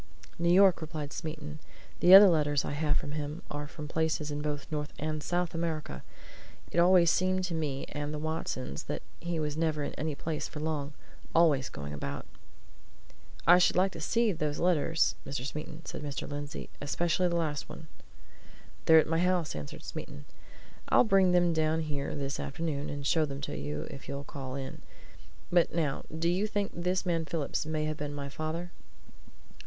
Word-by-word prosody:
"New 170 0 +2
York," 190 -1 +6
replied 155 -2 -5
Smeaton. 155 -1 -6 0.4
"The 180 +2 +9
other 200 +1 +11
letters 145 -5 +2
I - - -3
have 150 0 +1
from 145 - -3
him 150 +3 -4
are 145 0 -4
from 150 0 -8
places 160 -1 -1
in 145 0 -3
both 150 -1 -3
North 150 -1 -2
and 155 0 -2
South 175 +2 -1
America. 160 - -3 0.7
It - - +1
always 175 -1 +6
seemed 185 0 +1
to 180 -2 -2
me 145 -4 -2
and 145 0 -4
the 155 - -3
Watsons 150 - -3
that - - -4 0.2
he 170 -1 -2
was 150 -1 -2
never 155 -2 0
in - - -3
any 155 -1 -1
place 155 +1 -3
for 150 - -8
long 150 -2 -2 0.4
always 155 -6 +4
going 70 +1 -7
about." 70 -1 -5 1.2
"I 175 +2 +8
should 180 - +4
like 190 +2 +3
to 165 - -8
see 230 +6 +2
those 150 -4 -2
letters, 165 -2 +2
Mr. 135 -2 -4
Smeaton," 150 +2 -6
said - - -6
Mr. 145 -2 -4
Lindsey. 145 0 -6
"Especially 170 +4 +1
the 170 - -1
last 155 -3 -1
one." 160 - -9 1.0
"They're 160 - +8
at 160 - +6
my 165 +1 0
house," 180 -2 +1
answered 75 -2 -7
Smeaton. 70 - -7 0.6
"I'll - - +6
bring 195 -5 +4
them 175 -1 +4
down 160 0 +1
here 145 -3 -3
this 140 -1 -3
afternoon, 145 -1 -3
and 145 -1 -5
show 160 +3 +3
them 140 -2 -3
to 140 - -4
you 75 +3 -3
if 135 - -10
you'll 140 0 -4
call 135 -2 -6
in. 135 -1 -6 0.7
But 175 -2 +3
now 150 -5 -1
do 160 +1 -2
you 185 +5 +2
think 205 -1 -1
this 180 +2 -1
man 165 -2 0
Phillips 155 -1 -2
may 155 -1 -1
have 155 0 -2
been 145 -1 -4
my 140 -1 -4
father?" 160 +4 -4
155 Hz, 185 wpm, -30 LUFS, 145-170 Hz, 1.2 s, other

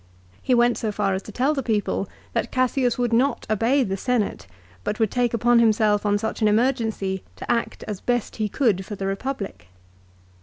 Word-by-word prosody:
He 255 - +2
went 240 0 +3
so 220 - -1
far 200 -1 0
as 190 - -2
to 215 - -10
tell 260 +7 +1
the 275 - -1
people 210 -4 -1 0.2
that 230 - -1
Cassius 255 -1 +1
would 240 -2 0
not 260 +5 +2
obey 235 +6 +3
the 195 -4 -2
Senate 220 - -1 0.4
but 215 - -3
would 220 -3 +2
take 245 -2 +1
upon 235 +1 +3
himself 215 -2 +3
on 205 0 +3
such 220 +2 -4
an 215 - +4
emergency 220 -4 +1
to - - -4
act 230 - -1
as 210 -3 -6
best 245 -2 -1
he 215 -1 -1
could 205 -6 +1
for 205 - -7
the 195 - -4
Republic. 195 - -4
225 Hz, 195 wpm, -23 LUFS, 205-245 Hz, 0.4 s, an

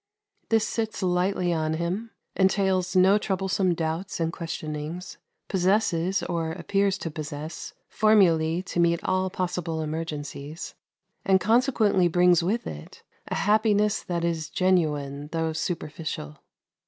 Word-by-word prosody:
This 225 -1 +3
sits 220 -3 -3
lightly 180 0 +1
on 160 -1 0
him; 180 +7 -3 0.3
entails 190 -1 +2
no 190 +3 +6
troublesome 190 -2 0
doubts 165 +4 -3
and 165 0 -1
questionings; 165 +1 -5 0.3
possesses, 190 -1 +1
or 165 -1 -2
appears 195 +3 0
to 165 - -5
possess, 150 +1 -6
formulae 175 -6 +3
to 175 - -4
meet 170 0 +2
all 185 0 +1
possible 180 -3 -3
emergencies, 155 -1 -5 0.5
and 190 -1 +4
consequently 220 -4 +3
brings 175 0 +4
with 205 +8 -1
it 75 0 -9 0.2
a - - -3
happiness 210 0 +2
that 170 -1 -2
is 160 -2 -2
genuine, 150 -6 0
though 160 -1 -1
superficial. 155 - -4
175 Hz, 120 wpm, -26 LUFS, 160-195 Hz, 0.5 s, no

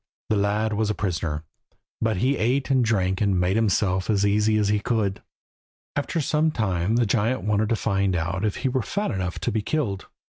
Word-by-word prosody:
The - - +4
lad 105 +2 +1
was 105 0 0
a 105 - 0
prisoner, 80 -5 -2 0.6
but 110 -3 +1
he 130 +8 +2
ate 130 +5 0
and 130 -2 +4
drank 95 -4 +1
and 100 -3 +2
made 90 +2 +1
himself 100 -4 +1
as 100 -2 +2
easy 105 +1 +2
as 105 -1 +1
he 105 0 +2
could. 100 -3 -1 0.7
After 145 +3 -1
some 155 +1 +2
time 100 - 0
the 120 0 +3
giant 115 +4 0
wanted 105 0 +1
to 115 - +2
find 100 -3 0
out 90 +4 -2
if 105 -2 0
he - - +5
were 130 0 0
fat 205 - -2
enough 95 -4 -3
to - - -1
be 110 - 0
killed. 105 -6 -2
105 Hz, 200 wpm, -24 LUFS, 95-115 Hz, 0.7 s, he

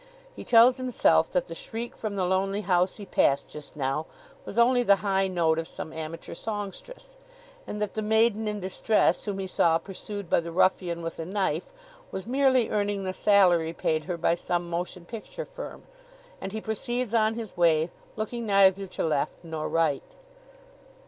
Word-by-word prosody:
He - - -8
tells 240 +2 +6
himself 225 -11 +3
that 180 - 0
the 165 - -8
shriek 225 +8 -6
from 215 -2 -4
the 190 -2 0
lonely 195 +2 0
house 180 -1 +1
he 205 - -9
passed 140 -6 +1
just 150 0 -10
now 140 +2 -2 0.4
was 200 - -7
only 245 +1 +5
the 200 -4 +5
high 195 -1 +2
note 165 -3 +1
of 165 - -4
some 160 - -7
amateur 160 +1 -6
songstress, 225 - -6 0.5
and 210 - -5
that 210 -1 -2
the 215 - -2
maiden 220 0 +2
in 210 0 -2
distress 190 +3 +1
whom 205 -2 -3
he 195 - -3
saw 165 -3 +3
pursued 195 +2 -7
by - - +3
the 170 0 -6
ruffian 175 -1 +1
with 165 0 -5
a - - -2
knife 185 -4 -1 0.4
was 190 0 -6
merely 260 -1 +3
earning 205 -1 0
the 185 0 -3
salary 180 -6 +4
paid 155 -2 -1
her 180 -2 -3
by 170 - +2
some 175 0 -2
motion 175 +1 -4
picture 365 - -7
firm. - - -9 0.6
And 195 - -5
he 220 +1 -4
proceeds 240 +2 -2
on 220 -1 +3
his 225 -3 -7
way, 165 -1 +3 0.2
looking 225 +2 -4
neither 195 -1 +4
to - - -4
left 155 +1 -1
nor 160 -2 -4
right. 160 -4 +1
195 Hz, 180 wpm, -27 LUFS, 170-220 Hz, 0.6 s, tells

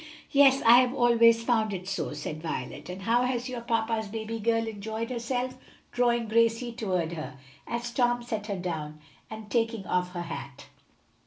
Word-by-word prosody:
"Yes; 275 -1 +5
I 235 +2 +9
have 255 0 +1
always 230 -2 +5
found 220 -4 +1
it 180 0 -7
so," 195 -5 -3
said 150 +1 -5
Violet. 145 -1 -5
"And 185 +2 -7
how 235 +4 +3
has 250 0 -1
your 250 -2 -5
papa's 225 -1 -1
baby 225 +2 -5
girl 225 +1 +1
enjoyed 220 +2 -4
herself?" 250 +1 -3 0.3
drawing 240 -1 +1
Gracie 230 +2 +2
toward 185 -8 -2
her, 150 -4 -6 0.3
as 235 0 -3
Tom 240 -1 +1
set 220 -3 -4
her 200 -2 -2
down, 155 -4 -4 0.3
and 220 -1 -9
taking 225 -4 0
off 180 0 -1
her 175 -1 -3
hat. 160 -5 -8
225 Hz, 170 wpm, -28 LUFS, 185-240 Hz, 0.3 s, I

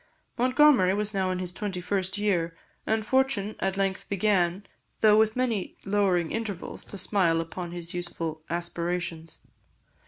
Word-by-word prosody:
Montgomery 255 -6 +5
was 210 +1 -1
now 190 -1 0
in 185 - -1
his 180 -1 -4
twenty 195 -2 -3
first 190 +1 -2
year, 175 -5 0 0.3
and 220 0 +1
fortune 260 -5 +1
at 195 0 -1
length 195 -1 -1
began, 195 -2 +1 0.4
though 215 -1 +7
with 220 0 +3
many 240 -6 -1
lowering 195 -4 +2
intervals, 215 -5 -4
to 200 - -7
smile 185 -5 +2
upon 170 +1 -5
his 175 -1 -5
youthful 165 -3 -4
aspirations. 170 -1 -3
190 Hz, 145 wpm, -27 LUFS, 175-210 Hz, 0.4 s, though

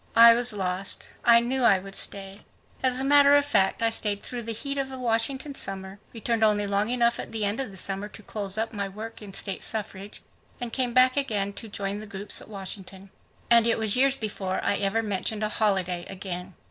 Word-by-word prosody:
I 230 0 +9
was 240 +1 +2
lost. 190 -1 -3 0.2
I 235 0 +7
knew 255 +2 -1
I 200 -5 +5
would 195 +1 -9
stay. 195 0 0 0.4
As 255 -1 +2
a - - 0
matter 285 0 +6
of 285 0 +3
fact, 230 -6 +1
I 225 - +2
stayed 210 -2 +2
through 245 -1 -4
the 230 0 -3
heat 275 +5 -3
of 270 -1 -3
a 260 - -7
Washington 255 +4 0
summer, 195 -4 -3
returned 230 0 -1
only 210 -1 +3
long 200 +2 0
enough 240 -1 +1
at - - -6
the 220 -2 -2
end 205 +4 -1
of 270 - -2
the 190 - -10
summer 195 +2 -3
to 215 +1 -14
close 200 -2 -2
up 225 +1 -2
my 200 -2 -3
work 220 +4 -8
in 205 -2 -9
state 195 -2 -3
suffrage 205 -2 -4 0.4
and 240 -2 -6
came 250 -2 -1
back 255 0 +6
to 210 -8 -1 0.2
join 200 -1 -4
the 215 - -8
group 205 -1 -8
at - - -13
Washington. 195 -1 -8 0.4
And 235 -1 +7
it 230 - +2
was 220 -2 0
years 270 +1 +3
before 200 -5 -3
I 200 - +1
ever 205 +3 0
mentioned 210 +1 -2
a 210 - 0
holiday 190 -5 0
again. 185 -1 -6
215 Hz, 215 wpm, -26 LUFS, 195-235 Hz, 0.4 s, I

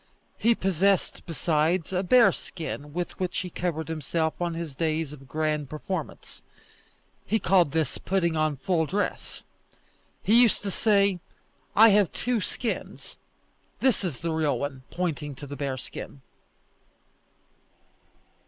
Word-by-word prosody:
He 230 +1 +4
possessed, 195 0 +1
besides, 165 +2 0
a 180 - +2
bearskin 180 - +2
with 175 +3 -4
which 185 -1 -2
he 180 -1 -6
covered 160 -3 -2
himself 160 0 -1
on 170 -1 -1
his 165 -3 -5
days 155 -1 -1
of 135 -2 -13
grand 150 0 -1
performance. 170 +5 -6 0.8
He 220 - +1
called 180 -7 +3
this 160 -3 -1
putting 175 -4 0
on 155 -1 +1
full 165 0 0
dress. 205 +6 -3 0.8
He 230 +4 +6
used 235 -4 +3
to 200 - -2
say, 200 -3 +3 0.6
"I 225 +2 +9
have 205 -4 +4
two 245 -3 -1
skins; 230 +3 -4 0.6
this 255 -7 +2
is 170 -9 -3
the 165 0 -1
real 155 -5 +1
one," 135 0 -4
pointing 155 -5 -3
to 145 - -8
the 145 0 -7
bearskin. 135 0 -5
165 Hz, 130 wpm, -27 LUFS, 150-195 Hz, 0.8 s, I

